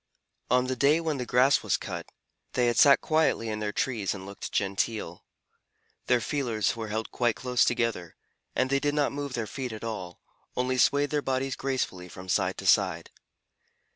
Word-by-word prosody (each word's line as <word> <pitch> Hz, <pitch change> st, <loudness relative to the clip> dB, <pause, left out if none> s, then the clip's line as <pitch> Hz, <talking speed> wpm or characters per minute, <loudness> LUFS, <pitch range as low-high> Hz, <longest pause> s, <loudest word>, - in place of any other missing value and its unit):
On 125 Hz, +1 st, +3 dB
the 130 Hz, 0 st, -2 dB
day 140 Hz, +5 st, +4 dB
when 160 Hz, -4 st, -2 dB
the 125 Hz, -, -4 dB
grass 130 Hz, +4 st, +4 dB
was -, -, +1 dB
cut, -, -, -6 dB, 0.5 s
they 125 Hz, -, +2 dB
had 120 Hz, -1 st, +1 dB
sat 140 Hz, -1 st, +7 dB
quietly 155 Hz, -7 st, +1 dB
in 105 Hz, 0 st, -3 dB
their 105 Hz, -1 st, -2 dB
trees 110 Hz, -5 st, -1 dB
and 95 Hz, -1 st, -8 dB
looked 100 Hz, 0 st, -7 dB
genteel. 100 Hz, -2 st, -2 dB, 0.8 s
Their 125 Hz, -1 st, +4 dB
feelers 115 Hz, -4 st, -1 dB
were 115 Hz, -1 st, -5 dB
held 110 Hz, +1 st, -3 dB
quite 120 Hz, -2 st, +1 dB
close 125 Hz, -2 st, +1 dB
together, 115 Hz, -8 st, -1 dB, 0.4 s
and 130 Hz, -, +1 dB
they 140 Hz, -, +3 dB
did 145 Hz, +1 st, 0 dB
not 145 Hz, -2 st, +2 dB
move 140 Hz, -1 st, -5 dB
their 120 Hz, -3 st, -2 dB
feet 130 Hz, +2 st, -5 dB
at 110 Hz, 0 st, -8 dB
all, 95 Hz, -6 st, -5 dB, 0.4 s
only 130 Hz, 0 st, 0 dB
swayed 145 Hz, +2 st, +3 dB
their 150 Hz, -1 st, +1 dB
bodies 135 Hz, 0 st, -1 dB
gracefully 110 Hz, -9 st, -3 dB
from 90 Hz, +2 st, -10 dB
side -, -, +1 dB
to -, -, -7 dB
side. -, -, +2 dB
125 Hz, 185 wpm, -28 LUFS, 110-135 Hz, 0.8 s, sat